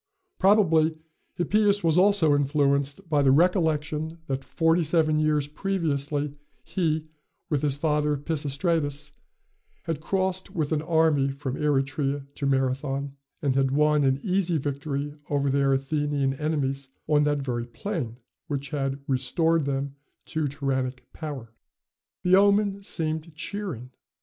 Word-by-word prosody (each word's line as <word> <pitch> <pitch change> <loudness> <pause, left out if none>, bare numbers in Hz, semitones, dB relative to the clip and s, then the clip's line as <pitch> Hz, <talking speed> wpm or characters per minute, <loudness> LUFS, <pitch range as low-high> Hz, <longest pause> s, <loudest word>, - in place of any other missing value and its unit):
Probably 165 -6 +4 0.4
Hippias 205 +3 +2
was 165 -2 +3
also 180 -5 +5
influenced 140 +3 +1
by 150 -3 +2
the 135 - +4
recollection 160 0 +2
that 135 -2 -3
forty 165 +1 +2
seven 155 -1 +2
years 150 -2 +1
previously, 150 -4 -1 0.3
he, 160 -2 -1 0.5
with 145 -3 +1
his 145 -2 +1
father 150 -1 +1
Pisistratus, 145 0 -1 0.7
had 165 -3 -3
crossed 190 +2 -1
with 155 -3 -1
an 155 -1 +1
army 160 -4 +2
from 135 -1 -4
Eretria 140 -1 0
to 140 - -2
Marathon, 135 +1 -1 0.3
and 135 -3 +1
had 135 -1 +3
won 150 +1 +3
an 135 0 +2
easy 185 -3 +1
victory 140 0 -3 0.2
over 140 -1 +1
their 140 0 +2
Athenian 140 0 0
enemies 140 -2 -2 0.2
on 150 -1 +4
that 145 -1 0
very 120 -2 -3
plain, 125 - -4 0.3
which 140 -2 -4
had 135 -2 -2
restored 150 +5 +1
them 140 0 -2 0.3
to 155 -2 -1
tyrannic 130 -2 -3
power. 135 -8 -7 0.7
The 180 +1 +5
omen 200 0 +3
seemed 160 -3 -3
cheering. 155 - -5
150 Hz, 130 wpm, -26 LUFS, 140-165 Hz, 0.7 s, also